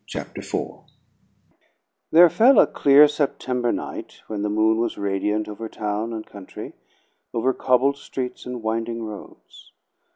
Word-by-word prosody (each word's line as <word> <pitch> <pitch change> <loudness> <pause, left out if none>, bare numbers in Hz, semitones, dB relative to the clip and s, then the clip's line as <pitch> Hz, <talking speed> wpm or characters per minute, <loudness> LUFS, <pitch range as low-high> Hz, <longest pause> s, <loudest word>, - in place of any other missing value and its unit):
Chapter - - -7
Four - - -5 1.3
There 175 +2 +8
fell 235 - +5
a - - +8
clear 145 +1 +6
September 130 -4 -1
night, - - -6
when 105 -2 -5
the 105 - -1
moon 110 +1 +2
was 120 - -1
radiant 105 +2 -1
over 110 +1 -7
town 105 +2 -3
and 110 -1 -6
country, 100 -2 -10 0.6
over 130 +3 +1
cobbled 130 +3 +2
streets 130 -3 -6
and 125 -2 -6
winding 115 +1 -2
roads. 105 -2 -11
115 Hz, 135 wpm, -23 LUFS, 105-130 Hz, 1.3 s, There